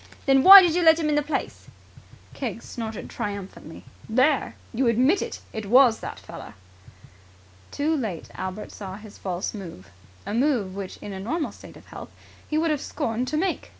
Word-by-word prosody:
Then 270 Hz, -1 st, +4 dB
why 385 Hz, +4 st, +11 dB
did 345 Hz, -3 st, +2 dB
you 355 Hz, -, +1 dB
let 320 Hz, -1 st, +6 dB
him 315 Hz, -2 st, -1 dB
into 295 Hz, 0 st, +2 dB
the 290 Hz, -, -12 dB
place?" 315 Hz, -, -4 dB, 0.7 s
Keggs 235 Hz, -4 st, -5 dB
snorted 225 Hz, -2 st, -6 dB
triumphantly. 200 Hz, -7 st, -7 dB, 0.2 s
"There! 260 Hz, +5 st, +2 dB, 0.2 s
You 250 Hz, +2 st, +1 dB
admit 255 Hz, -, +3 dB
it! -, -, -6 dB
It 220 Hz, -2 st, -5 dB
was 245 Hz, 0 st, +5 dB
that -, -, -7 dB
feller!" -, -, -11 dB, 1.1 s
Too 310 Hz, +3 st, -1 dB
late 215 Hz, -, -4 dB
Albert 190 Hz, +3 st, -6 dB
saw 190 Hz, -2 st, -8 dB
his 210 Hz, 0 st, -13 dB
false 185 Hz, -1 st, -4 dB
move 165 Hz, -, -10 dB, 0.3 s
a -, -, -4 dB
move 235 Hz, -6 st, 0 dB
which 195 Hz, -2 st, -7 dB
in 205 Hz, -, -6 dB
a 190 Hz, -, -6 dB
normal 300 Hz, -, -3 dB
state -, -, -14 dB
of -, -, -17 dB
health, -, -, -10 dB, 0.4 s
he 305 Hz, -, -1 dB
would 320 Hz, 0 st, +1 dB
have 295 Hz, -, -1 dB
scorned 230 Hz, +3 st, -3 dB
to 305 Hz, +4 st, -2 dB
make. 365 Hz, +2 st, -2 dB
235 Hz, 185 wpm, -24 LUFS, 200-300 Hz, 1.1 s, why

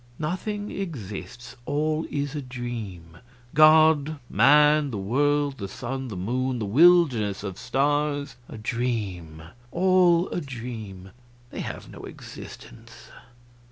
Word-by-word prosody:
"Nothing 205 Hz, +6 st, -3 dB
exists; 125 Hz, -, -7 dB
all 155 Hz, +2 st, -1 dB
is 145 Hz, -1 st, -3 dB
a 150 Hz, -, -3 dB
dream. 115 Hz, -10 st, -7 dB, 0.3 s
God 155 Hz, 0 st, +5 dB
man 150 Hz, +5 st, +5 dB
the 115 Hz, -, -4 dB
world 140 Hz, +7 st, 0 dB
the 100 Hz, -, -4 dB
sun, 130 Hz, +5 st, -5 dB
the 105 Hz, -6 st, -6 dB
moon, 125 Hz, +7 st, -1 dB
the 110 Hz, -, -3 dB
wilderness 125 Hz, -, +4 dB
of 95 Hz, -3 st, -6 dB
stars 145 Hz, +1 st, 0 dB
a -, -, -8 dB
dream, 105 Hz, -9 st, -3 dB, 0.3 s
all 180 Hz, +1 st, +3 dB
a 175 Hz, -, -3 dB
dream; 115 Hz, -, -8 dB, 0.4 s
they -, -, -7 dB
have -, -, -6 dB
no -, -, -10 dB
existence. -, -, -12 dB
135 Hz, 120 wpm, -25 LUFS, 110-150 Hz, 0.4 s, God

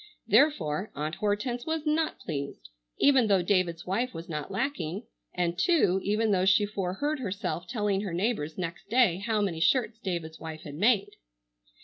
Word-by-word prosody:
Therefore 210 Hz, -, +2 dB
Aunt 150 Hz, +2 st, -3 dB
Hortense 240 Hz, -, -2 dB
was 320 Hz, -1 st, -2 dB
not 310 Hz, +1 st, +1 dB
pleased, 140 Hz, -, -6 dB, 0.3 s
even 265 Hz, -5 st, +5 dB
though 195 Hz, -3 st, +3 dB
David's 175 Hz, -3 st, +1 dB
wife 235 Hz, +7 st, -1 dB
was 165 Hz, +1 st, -7 dB
not 150 Hz, -3 st, -4 dB
lacking, 195 Hz, -, -2 dB, 0.3 s
and, 175 Hz, 0 st, -1 dB
too, 195 Hz, -, +3 dB
even 215 Hz, +2 st, +1 dB
though 185 Hz, -2 st, +2 dB
she 190 Hz, +2 st, +4 dB
foreheard 205 Hz, +9 st, -2 dB
herself 190 Hz, -5 st, -3 dB
telling 205 Hz, -2 st, 0 dB
her 200 Hz, -3 st, -4 dB
neighbors 175 Hz, -4 st, -1 dB
next 175 Hz, +1 st, -5 dB
day 230 Hz, -7 st, +4 dB
how 215 Hz, +1 st, 0 dB
many 180 Hz, -5 st, -1 dB
shirts 225 Hz, +6 st, +2 dB
David's 170 Hz, -6 st, -4 dB
wife 160 Hz, -1 st, -7 dB
had 145 Hz, -, -8 dB
made. 205 Hz, +6 st, +2 dB
195 Hz, 160 wpm, -28 LUFS, 170-230 Hz, 0.3 s, even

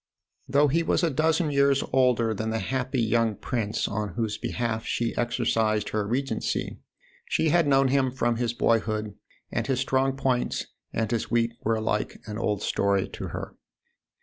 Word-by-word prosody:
Though 140 Hz, +3 st, +4 dB
he 160 Hz, +5 st, +2 dB
was 165 Hz, +1 st, +1 dB
a 165 Hz, -, +2 dB
dozen 160 Hz, +2 st, +1 dB
years 140 Hz, -1 st, +3 dB
older 125 Hz, -4 st, +3 dB
than 110 Hz, +1 st, -3 dB
the 110 Hz, -, -1 dB
happy 130 Hz, +5 st, -2 dB
young 115 Hz, -1 st, +2 dB
prince 110 Hz, -1 st, -2 dB
on 105 Hz, -2 st, -3 dB
whose 110 Hz, -3 st, -1 dB
behalf 110 Hz, 0 st, -2 dB
she 120 Hz, -1 st, -1 dB
exercised 110 Hz, -3 st, +1 dB
her 105 Hz, -1 st, -1 dB
regency, 135 Hz, +5 st, -2 dB, 0.5 s
she 160 Hz, -, +2 dB
had 170 Hz, -1 st, +3 dB
known 135 Hz, -1 st, +4 dB
him 135 Hz, -1 st, +2 dB
from 120 Hz, -2 st, 0 dB
his 120 Hz, -1 st, 0 dB
boyhood, 110 Hz, -3 st, 0 dB, 0.4 s
and -, -, -1 dB
his 130 Hz, -2 st, +1 dB
strong 135 Hz, 0 st, +1 dB
points 130 Hz, -2 st, 0 dB, 0.3 s
and 110 Hz, -1 st, -1 dB
his 115 Hz, -2 st, -1 dB
weak 115 Hz, 0 st, +2 dB
were 115 Hz, +1 st, +2 dB
alike 110 Hz, -1 st, -1 dB
an 105 Hz, 0 st, -5 dB
old 105 Hz, -2 st, -1 dB
story 100 Hz, -1 st, +1 dB
to -, -, -6 dB
her. -, -, -6 dB
120 Hz, 170 wpm, -26 LUFS, 110-135 Hz, 0.5 s, Though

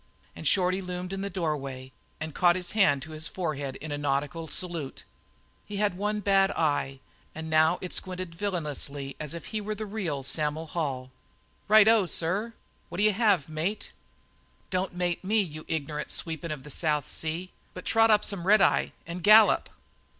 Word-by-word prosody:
Shorty 185 Hz, -1 st, +2 dB
loomed 180 Hz, 0 st, -5 dB
in 195 Hz, -, -3 dB
the 200 Hz, -, -2 dB
doorway 140 Hz, -7 st, -3 dB, 0.3 s
and 155 Hz, 0 st, -5 dB
caught 175 Hz, -1 st, +4 dB
his 180 Hz, -1 st, -4 dB
hand 185 Hz, -11 st, +3 dB
to 160 Hz, -, -10 dB
his 155 Hz, +1 st, -5 dB
forehead 145 Hz, -7 st, -3 dB
in 155 Hz, 0 st, -7 dB
a 145 Hz, -, -2 dB
nautical 145 Hz, +3 st, -1 dB
salute. 165 Hz, -5 st, -6 dB, 0.6 s
He 205 Hz, -, -5 dB
had 205 Hz, -3 st, +1 dB
one 210 Hz, +2 st, -1 dB
bad 195 Hz, -1 st, +4 dB
eye, 145 Hz, -4 st, 0 dB, 0.3 s
and 160 Hz, 0 st, -6 dB
now 160 Hz, +2 st, +4 dB
it 180 Hz, -, -5 dB
squinted 185 Hz, -2 st, -4 dB
as 165 Hz, -, -18 dB
villainously 145 Hz, -7 st, -3 dB
as 155 Hz, +1 st, -2 dB
if 170 Hz, -, -7 dB
he 215 Hz, -1 st, -3 dB
were 210 Hz, +1 st, -3 dB
the 215 Hz, +1 st, -5 dB
real 185 Hz, -10 st, -3 dB
Sam'l 150 Hz, +3 st, +1 dB
Hall. 135 Hz, -6 st, -3 dB, 0.6 s
"Righto 215 Hz, -1 st, +6 dB
sir. 195 Hz, +9 st, -1 dB, 0.4 s
What'll 200 Hz, +4 st, +1 dB
you 215 Hz, -, +4 dB
have, 200 Hz, -, +3 dB
mate?" 160 Hz, +7 st, -3 dB, 0.8 s
"Don't 185 Hz, -1 st, -1 dB
mate 175 Hz, 0 st, -1 dB
me, 215 Hz, +4 st, +2 dB
you 155 Hz, -6 st, -3 dB
igner'nt 150 Hz, -1 st, -3 dB
sweepin' 165 Hz, 0 st, -3 dB
of 150 Hz, -4 st, -5 dB
the 150 Hz, -, -10 dB
South 150 Hz, -1 st, 0 dB
Sea, 165 Hz, +4 st, -4 dB, 0.2 s
but 180 Hz, -, -8 dB
trot 225 Hz, 0 st, +4 dB
up 210 Hz, -1 st, +4 dB
some 190 Hz, -4 st, -2 dB
red 215 Hz, +2 st, +7 dB
eye -, -, +3 dB
and 170 Hz, +2 st, -6 dB
gallop." 215 Hz, +2 st, +6 dB
175 Hz, 175 wpm, -28 LUFS, 150-195 Hz, 0.8 s, red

